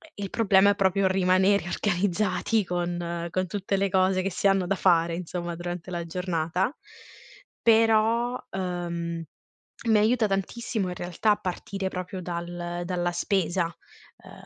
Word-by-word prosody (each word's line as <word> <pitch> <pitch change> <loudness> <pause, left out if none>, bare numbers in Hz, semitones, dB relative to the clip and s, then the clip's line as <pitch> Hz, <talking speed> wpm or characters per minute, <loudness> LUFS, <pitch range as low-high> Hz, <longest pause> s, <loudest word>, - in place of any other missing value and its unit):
il 200 -1 -5
problema 200 -2 +4
è - - 0
proprio 195 -1 +2
rimanere 190 +1 +3
organizzati 200 +3 0
con 175 -1 -2
con 185 +2 -1
tutte 195 +2 -2
le 195 0 +1
cose 185 0 +2
che 195 - -1
si 180 - -4
hanno 195 -2 +2
da 195 - +1
fare 170 -3 +3
insomma, 175 0 -4
durante 175 +1 -6
la 170 -1 -3
giornata. 180 - -1 0.9
Però, 225 +2 +3
uhm, 170 -3 -3 0.6
mi 220 -1 +5
aiuta 225 +2 +3
tantissimo 205 +1 -2
in 180 - -5
realtà 180 +5 +1
partire 195 0 -4
proprio 185 0 -5
dal 175 0 -4
dalla 175 -1 -1
spesa, 175 0 0
uhm, 165 - -14
185 Hz, 135 wpm, -26 LUFS, 175-200 Hz, 0.9 s, mi